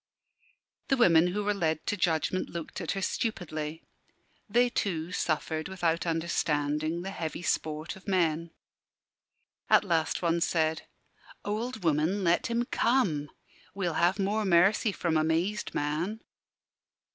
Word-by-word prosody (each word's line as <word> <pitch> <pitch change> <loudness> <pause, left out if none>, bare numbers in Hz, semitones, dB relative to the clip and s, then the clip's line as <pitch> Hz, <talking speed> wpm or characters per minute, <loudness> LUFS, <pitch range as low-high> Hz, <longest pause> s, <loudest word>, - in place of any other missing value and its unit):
The 270 - +2
women 175 -7 +5
who 205 +4 -2
were 210 +1 +1
led 160 -5 -1
to - - 0
judgment 175 0 0
looked 170 -2 -6
at - - -2
her 195 -1 -3
stupidly. 160 -9 -3 0.7
They 240 +4 +4
too 180 -8 -2
suffered, 155 -1 -1
without 175 -3 -1
understanding, 160 -1 0
the 195 - -4
heavy 165 -3 -5
sport 155 -1 -2
of 190 - -16
men. 170 -3 +1 1.2
At - - +6
last 165 -3 0
one 170 0 +1
said 160 -1 0 0.6
"Old 220 +1 -3
woman, 165 +5 +1
let 170 0 +2
him 235 +1 0
come. 195 - +1 0.5
We'll 180 -4 -1
have 175 +4 +2
more 205 +2 0
mercy 195 +4 +4
from 170 -4 0
a 155 - +2
mazed 170 +6 -1
man." 165 +9 -2
170 Hz, 135 wpm, -29 LUFS, 160-200 Hz, 1.2 s, At